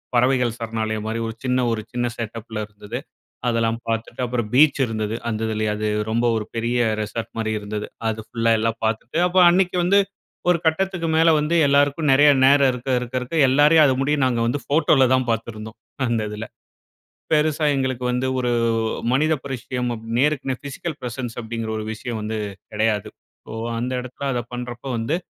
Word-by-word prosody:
பறவைகள் 125 -1 +2
சரணாலயம் 110 -1 -3
மாரி 115 +1 -2
ஒரு 115 - -6
சின்ன 125 0 +1
ஒரு 110 -1 -1
சின்ன 120 0 0
செட்டப் 115 0 -6
ல 110 - -1
இருந்தது. 105 +3 -7 0.5
அதெல்லாம் 115 0 0
பார்த்துட்டு, 115 +2 -3
அப்பறம் 120 -3 -3
பீச் 145 0 +5
இருந்தது. 110 -1 -2
அந்த 110 -1 -2
இதுலயே 110 -1 -1
அது 105 0 -2 0.2
ரொம்ப 115 +2 +1
ஒரு 105 - -3
பெரிய 120 +2 0 0.2
ரெசார்ட் 110 +2 -5
மாரி 110 -1 -1
இருந்தது. 105 0 -5 0.2
அது 110 0 -3
ஃபுல்லா 115 -1 +1
எல்லாம் 115 0 -1
பார்த்துட்டு, 115 +6 -2
அப்ப 180 +1 +2
அன்னக்கி 180 0 +2
வந்து, 200 +3 +4 0.5
ஒரு 175 - +4
கட்டத்துக்கு 170 +1 0
மேல 165 +1 +5
வந்து 150 +3 0
எல்லாருக்கும் 145 +2 +2
நெறைய 145 +2 +6 0.2
நேரம், 140 -1 +6
இருக்க, 125 +2 -6
இருக்க, 125 +1 -6
இருக்க 145 +6 -4
எல்லாரையும் 150 +3 +6
அத 135 - +4
முடிய 145 +2 +2
நாங்க 125 -2 +1
வந்து 140 +4 -1
ஃபோட்டோல 145 -3 +4
தான் 130 -1 0
பார்த்துருந்தோம், 110 -1 -5 0.3
அந்த 115 -2 0
இதுல. 105 +1 -5 0.9
பெருசா 155 0 +2
எங்களுக்கு 130 -2 -1
வந்து 125 +1 0
ஒரு 125 -1 0 0.6
மனித 155 +4 +3
பரிட்சையம் 125 -1 -3
அப் 110 - -10
நேருக்கு 145 -1 +1
நே - - +1
பிசிக்கல் 150 +3 -5
பிரசன்ஸ் 120 -1 -5
அப்பிடிங்கிற 115 -1 -4
ஒரு 110 - -4
விஷயம் 110 0 -5
வந்து 110 +1 -3 0.3
கெடையாது. 105 -1 0 0.4
சோ, - - -9 0.3
அந்த 125 +2 -2
இடத்துல 130 +2 -7
அத 120 -1 -1
பண்றப்போ 125 +1 -6
வந்து 130 +9 0
120 Hz, 175 wpm, -22 LUFS, 115-140 Hz, 0.9 s, நெறைய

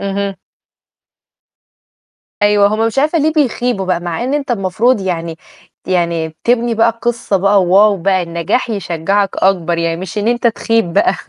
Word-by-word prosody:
اهم. 200 0 -3 2.1
أيوه، 205 -1 +4
هو 215 +2 0
مش 225 +4 -2
عارفة 305 +4 +2
ليه 310 +1 +1
بيخيبوا 245 - 0
بقى، 180 -2 0
مع 175 +4 -4
إن 265 +3 -1
أنت 285 -3 -3
المفروض 215 +3 +1
يعني 170 -3 -3 0.5
يعني 170 -3 -1
تبني 240 -1 +1
بقى 225 +1 +3
القصة 230 -2 -1
بقى، 195 0 +3
واو 200 +3 +4
بقى! 185 +1 0
النجاح 170 +8 -2
يشجّعك 195 0 -1
أكبر، 175 -3 +1
يعني 165 0 -1
مش 190 +4 -5
إن 210 +2 0
أنت 240 0 +1
تخيب 225 -4 0
بقى. 350 - +2
200 Hz, 155 wpm, -15 LUFS, 180-235 Hz, 2.1 s, أيوه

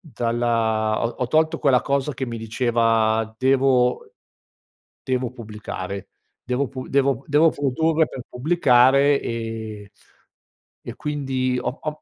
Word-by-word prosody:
dalla 115 - -1
ho - - +2
ho 125 - -3
tolto 155 +4 +2
quella 130 -3 +3
cosa 140 +1 -1
che 130 +1 -3
mi 115 -1 -5
diceva: 115 -1 +1
"Devo 130 -1 +2 0.9
devo 130 -2 -1
pubblicare, 105 -4 -7 0.3
devo 125 +3 -1
pu 130 0 -8
devo 135 -3 +1
p - - -27
devo 155 +3 +4
produrre 160 +4 +1
per 125 - -8
pubblicare." 140 -1 +4
Ehm, 110 -3 -5 0.9
e - - -8
quindi 135 -4 -2
ho - - -1
ho 155 0 -5
125 Hz, 125 wpm, -22 LUFS, 115-140 Hz, 0.9 s, devo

